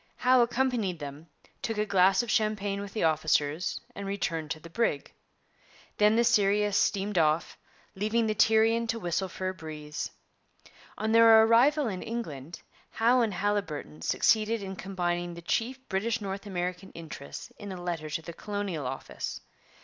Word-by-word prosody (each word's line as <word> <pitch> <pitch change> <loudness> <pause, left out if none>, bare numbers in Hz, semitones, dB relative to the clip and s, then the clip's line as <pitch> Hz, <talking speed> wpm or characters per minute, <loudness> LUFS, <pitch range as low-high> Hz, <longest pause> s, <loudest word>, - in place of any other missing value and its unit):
Howe 255 0 +4
accompanied 235 -6 0
them, 145 +2 -8 0.3
took 225 -2 -3
a 210 - +1
glass 190 0 +4
of 235 - -3
champagne 205 -3 0
with 200 -1 -7
the 220 - -1
officers, 155 0 +1
and 200 -3 -6
returned 165 -6 -2
to 155 - -3
the 160 - -11
brig. 165 -6 -1 0.8
Then 210 +1 +4
the 235 - +4
Sirius 210 -3 +3
steamed 200 -2 +1
off, 155 +1 +1 0.4
leaving 215 +4 0
the 215 - +1
Tyrian 225 +2 +3
to 230 0 -2
whistle 180 0 -1
for 185 +1 -3
a - - -4
breeze. 150 -3 -6 0.9
On 220 +1 -1
their 225 -1 +8
arrival 255 +6 +4
in 190 -4 -4
England, 165 - -6 0.3
Howe 240 +3 +3
and 215 -5 0
Haliburton 165 - -2
succeeded 215 - +2
in 190 0 -5
combining 175 -2 -2
the 170 - -9
chief 235 +9 -1
British 215 +5 -1
North 200 0 -5
American 180 0 -4
interests 160 -4 -9
in 205 -2 -7
a 185 - -6
letter 170 -3 -4
to 160 +2 -3
the 170 - -8
Colonial 195 -7 -4
Office. 135 +1 -5
195 Hz, 160 wpm, -28 LUFS, 170-220 Hz, 0.9 s, their